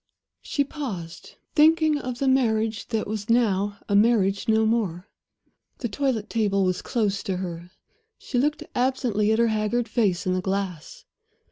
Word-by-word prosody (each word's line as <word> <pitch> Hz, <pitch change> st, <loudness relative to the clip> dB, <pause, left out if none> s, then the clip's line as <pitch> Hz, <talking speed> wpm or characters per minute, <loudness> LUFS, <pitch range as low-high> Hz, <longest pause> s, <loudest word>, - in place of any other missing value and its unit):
She 285 Hz, -, 0 dB
paused, 215 Hz, -, -7 dB, 0.2 s
thinking 310 Hz, -1 st, +4 dB
of 250 Hz, -3 st, -5 dB
the 275 Hz, -, -1 dB
marriage 225 Hz, -5 st, +1 dB
that 225 Hz, -2 st, -1 dB
was 215 Hz, +1 st, -5 dB
now 205 Hz, -4 st, +2 dB
a 200 Hz, -, +1 dB
marriage 205 Hz, -2 st, +3 dB
no 220 Hz, 0 st, +3 dB
more. 205 Hz, -5 st, -1 dB, 0.7 s
The 240 Hz, -, -3 dB
toilet 235 Hz, -2 st, -1 dB
table 205 Hz, -4 st, +1 dB
was 185 Hz, -1 st, 0 dB
close 205 Hz, -5 st, -1 dB
to 190 Hz, -2 st, -3 dB
her; 175 Hz, -1 st, -6 dB, 0.5 s
she 250 Hz, -, -2 dB
looked 295 Hz, +3 st, 0 dB
absently 245 Hz, -5 st, +1 dB
at 220 Hz, -, +2 dB
her 235 Hz, 0 st, +3 dB
haggard 220 Hz, +2 st, 0 dB
face 210 Hz, -5 st, 0 dB
in 185 Hz, -, +1 dB
the 185 Hz, -, 0 dB
glass. 190 Hz, -4 st, -4 dB
220 Hz, 155 wpm, -25 LUFS, 195-245 Hz, 0.7 s, thinking